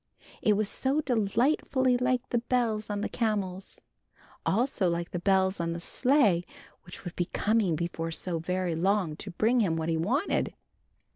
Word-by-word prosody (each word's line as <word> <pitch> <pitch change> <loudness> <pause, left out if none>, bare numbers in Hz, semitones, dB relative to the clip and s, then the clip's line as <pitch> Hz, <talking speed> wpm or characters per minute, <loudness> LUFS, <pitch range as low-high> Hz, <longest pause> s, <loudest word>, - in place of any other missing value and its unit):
It 215 - +4
was 215 -1 +1
so 270 +7 0
delightfully 255 +2 +1
like 250 0 0
the 240 - +1
bells 230 -3 0
on 205 -1 -2
the - - -1
camels, 200 -5 -2 0.7
also 220 -3 +1
like 170 0 -2
the 175 - -2
bells 190 0 +2
on 170 0 -1
the 170 - -5
sleigh 220 - +2 0.4
which 175 - -10
would 175 - -6
be 175 - 0
coming 205 -3 +1
before 165 0 -3
so 165 +1 -3
very 180 +1 -1
long 180 -1 +1
to 200 - -7
bring 220 +7 +2
him 185 -8 +2
what 160 0 -2
he 165 - +1
wanted. 245 - 0
200 Hz, 165 wpm, -28 LUFS, 175-240 Hz, 0.7 s, It